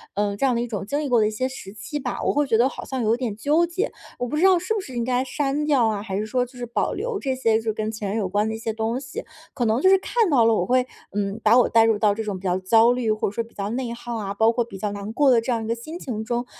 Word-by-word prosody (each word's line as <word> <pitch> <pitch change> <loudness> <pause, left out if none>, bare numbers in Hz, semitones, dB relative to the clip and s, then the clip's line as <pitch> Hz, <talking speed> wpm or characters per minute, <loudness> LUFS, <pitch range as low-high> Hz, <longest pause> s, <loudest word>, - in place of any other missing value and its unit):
呃， 205 0 0
这 275 - +1
样 255 -2 +2
的 235 - 0
一 240 - -2
种 205 -4 -4
经 285 +8 -1
历 290 - -3
过 245 -2 +4
的 215 - +3
一 - - -2
些 255 +4 -1
时 200 -7 -9
期 225 +8 -5
吧。 - - -4
我 - - +2
会 290 0 +1
觉 230 -3 +3
得 245 +3 +4
好 - - -8
像 260 -3 -3
有 220 +1 +3
点 240 -5 -3
纠 295 +10 +2
结， 370 +7 -2 0.3
我 245 - -1
不 300 - -2
知 320 - +1
道 380 -1 +6
是 365 +5 -2
不 435 - -1
是 260 -8 -10
应 235 - -1
该 250 +1 +1
删 285 +2 -1
掉 275 -6 +3
啊， 210 -2 -1
还 195 -2 -4
是 210 - -1
说 250 +3 0
就 250 +1 -16
是 245 - -4
保 235 - -1
留 480 -3 -3
这 265 -6 -1
些 225 -4 +2
就 225 - -5
是 220 -1 -1
跟 215 0 -3
前 210 -2 -4
任 205 - -2
有 200 - -1
关 205 +3 +1
的 220 - -2
一 - - -5
些 225 0 -3
东 225 +3 -2
西。 265 0 -7 0.3
可 245 - -1
能 225 +3 +1
就 375 - +5
是 385 - +7
看 445 +2 +1
到 250 -7 +4
了 225 - +4
我 180 -5 +1
会， 250 +4 +2 0.3
嗯， 200 +1 -2
把 220 +3 +6
我 250 - +5
带 225 -1 +5
入 225 -1 +3
到 210 -2 +3
这 220 +2 -4
种 205 -3 -3
比 - - -18
较 180 -1 +1
焦 225 +5 +5
虑， 245 -3 0
或 215 - 0
者 - - -9
说 230 - -1
比 230 - -19
较 200 0 -3
内 245 0 -3
耗 240 0 -6
啊， 200 -3 -3
包 220 +2 +3
括 240 +1 0
比 230 -4 -10
较 205 +2 -2
难 205 +1 -6
过 280 +1 +4
的 235 -2 +4
这 240 - -2
样 230 -2 -1
一 - - -5
个 230 - 0
心 310 +9 -8
情 220 -8 -4
中， 240 +2 -2
230 Hz, 365 characters per minute, -23 LUFS, 215-260 Hz, 0.3 s, 是